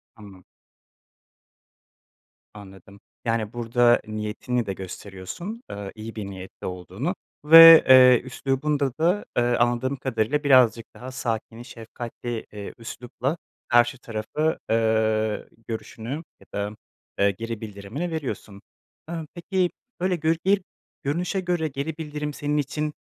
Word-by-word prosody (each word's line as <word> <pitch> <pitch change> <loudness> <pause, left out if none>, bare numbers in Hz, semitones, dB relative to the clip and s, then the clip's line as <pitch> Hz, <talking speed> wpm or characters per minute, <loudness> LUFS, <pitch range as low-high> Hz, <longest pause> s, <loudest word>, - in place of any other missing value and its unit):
Anla 100 -4 -14 2.1
Anladım. 100 -1 -13 0.3
Yani, 115 -1 -1
burada 120 0 +3
niyetini 110 +3 -2
de 100 - -3
gösteriyorsun, 95 - -8
eee, 100 -1 -6
iyi 110 +1 -8
bir 105 -3 -5
niyetle 95 -1 -8
olduğunu 95 - -4 0.3
ve, 165 +1 +11
eee, 125 -2 +8
üslubunda 135 +2 -1
da, 180 +5 +2
eee, 120 - +4
anladığım 120 +2 +1
kadarıyla 130 +2 -1
birazcık 125 -5 +5
daha 130 +1 -8
sakin, 115 -2 -4
şefkatli, 120 0 -7
eee, 100 -1 -7
üslupla 125 +5 -4 0.3
karşı 120 +1 +4
tarafı, 120 +8 -2
eee, 110 -1 +1 0.2
görüşünü 115 0 -6 0.3
ya - - -19
da, 100 +1 -3 0.4
eee, 100 0 +4
geri 115 +3 -6
bildirimini 110 - -5
veriyorsun. 125 -10 -5 0.5
Eee, 170 - -3 0.2
peki, 180 0 0 0.3
böyle 185 +1 +1
gör 165 0 +1
bir 195 0 +4 0.4
görünüşe 175 +7 -1
göre 175 -3 -1
geri 145 +3 -4
bildirim 150 -1 -4
senin 145 +1 -2
için, 150 +1 -2
120 Hz, 120 wpm, -24 LUFS, 110-150 Hz, 2.1 s, ve